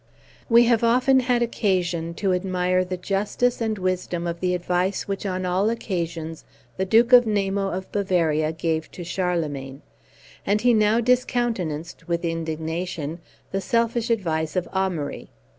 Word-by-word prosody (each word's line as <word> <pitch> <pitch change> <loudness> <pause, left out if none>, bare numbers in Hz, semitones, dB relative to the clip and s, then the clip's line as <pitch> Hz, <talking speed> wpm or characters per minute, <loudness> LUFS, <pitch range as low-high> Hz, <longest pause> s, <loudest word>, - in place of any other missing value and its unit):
We 235 0 +7
have 235 -1 +2
often 255 +3 +4
had 245 -1 +2
occasion 175 -7 -1
to 195 -1 0
admire 185 0 +1
the 185 0 -4
justice 205 +7 0
and 220 -2 -1
wisdom 185 -2 -2
of 170 0 -3
the 180 0 0
advice 180 +2 -1
which 200 0 -3
on 185 -1 -2
all 185 +4 +1
occasions 170 -7 -4 0.3
the 190 - 0
Duke 230 +5 +4
Namo 200 -5 +4
of 190 +1 -5
Bavaria 165 -6 +1
gave 160 -1 -2
to 175 - -7
Charlemagne, 155 -7 -3 0.6
and 210 +1 +1
he 245 +1 +4
now 215 +1 +3
discountenanced, 225 -10 -1
with 170 0 -1
indignation, 165 0 -3 0.3
the 195 - -1
selfish 230 +3 0
advice 160 -8 -1
of 180 -2 0
Amaury. 180 -7 -2
185 Hz, 140 wpm, -24 LUFS, 170-215 Hz, 0.6 s, We